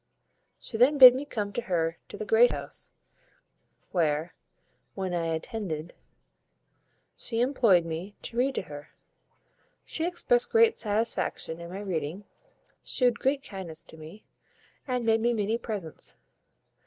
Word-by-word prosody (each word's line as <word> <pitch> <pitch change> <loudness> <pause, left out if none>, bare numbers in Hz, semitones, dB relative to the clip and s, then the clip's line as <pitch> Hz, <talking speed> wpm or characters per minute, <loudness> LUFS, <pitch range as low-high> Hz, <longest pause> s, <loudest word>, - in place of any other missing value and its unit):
She 225 - -6
then 265 +6 +5
bid 255 -2 +11
me 265 +3 -4
come 210 -7 -4
to 240 - -1
her 165 -5 -1
to - - -8
the 215 - -5
great 225 +4 +5
house; - - -5 1.0
where, 160 -1 0 0.6
when 190 -2 -3
I 170 -1 -1
attended, 165 -1 -4 1.2
she 230 - -4
employed 235 -9 +4
me 170 +5 -5
to - - -7
read 260 +3 +1
to - - -1
her. 145 -3 -11 0.9
She 325 - -1
expressed 480 +7 +2
great 455 0 +4
satisfaction 210 -6 -1
in 170 - -8
my 190 +3 -6
reading, 175 -1 -3 0.6
shewed 245 -2 +1
great 275 +1 0
kindness 185 - -7
to 160 - -13
me, 160 +7 -12 0.6
and 250 -2 -1
made 225 0 +3
me 240 +1 +2
many 220 +1 0
presents. 200 -10 -6
210 Hz, 140 wpm, -28 LUFS, 170-245 Hz, 1.2 s, bid